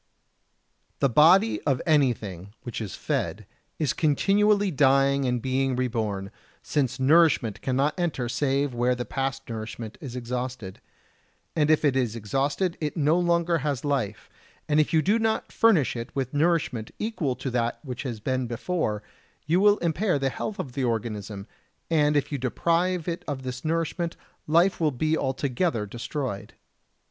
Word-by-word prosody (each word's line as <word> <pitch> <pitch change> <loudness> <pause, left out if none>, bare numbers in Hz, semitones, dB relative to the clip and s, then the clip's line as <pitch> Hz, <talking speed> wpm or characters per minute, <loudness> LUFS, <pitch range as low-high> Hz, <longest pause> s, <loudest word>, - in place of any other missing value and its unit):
62. - - -47
The 140 - +4
body 175 - +5
of 135 -4 +1
anything 110 - 0
which 120 -1 -5
is 105 -4 -5
fed - - -2 0.3
is 150 -6 0
continually 200 +6 +2
dying 140 -1 +3
and 125 -1 0
being 130 +1 0
reborn, 110 -6 -2 0.3
since 135 -3 -1
nourishment 135 - +3
cannot 135 +6 0
enter 155 -8 -1
save 135 +2 0
where 120 +1 +1
the 125 0 -4
past 135 0 -3
nourishment 110 0 -6
is 130 -4 -7
exhausted; 125 -4 -5 0.7
and 150 -2 +2
if 155 0 +3
it 140 -3 +3
is 120 -4 0
exhausted, 140 - -1
it 150 +2 -2
no 150 +1 +3
longer 170 -1 +2
has 140 -1 -2
life, 125 -8 -2 0.4
and 150 0 +3
if 155 0 +2
you 160 -2 +3
do 210 +7 +3
not 220 -1 0
furnish 180 - +3
it 115 0 -5
with 135 -2 -2
nourishment 150 -7 +1
equal 180 - -2
to 130 - -4
that 120 -1 0
which 125 -2 -5
has 120 -5 -5
been 130 +2 -1
before, 120 - -2 0.4
you 170 +4 +2
will 205 +1 +5
impair 175 +1 +1
the 135 -1 0
health 205 +9 -4
of 130 - -5
the 135 +1 -3
organism, 105 -4 -3 0.5
and 150 -2 +3
if 145 - -1
you 140 - -2
deprive 170 +7 0
it 170 0 -3
of 135 -3 -4
this 130 0 -5
nourishment, 165 +1 -1 0.3
life 170 +5 +3
will 160 -2 +3
be 155 +4 0
altogether 135 - -1
destroyed. 120 0 -5
135 Hz, 160 wpm, -26 LUFS, 120-160 Hz, 0.7 s, body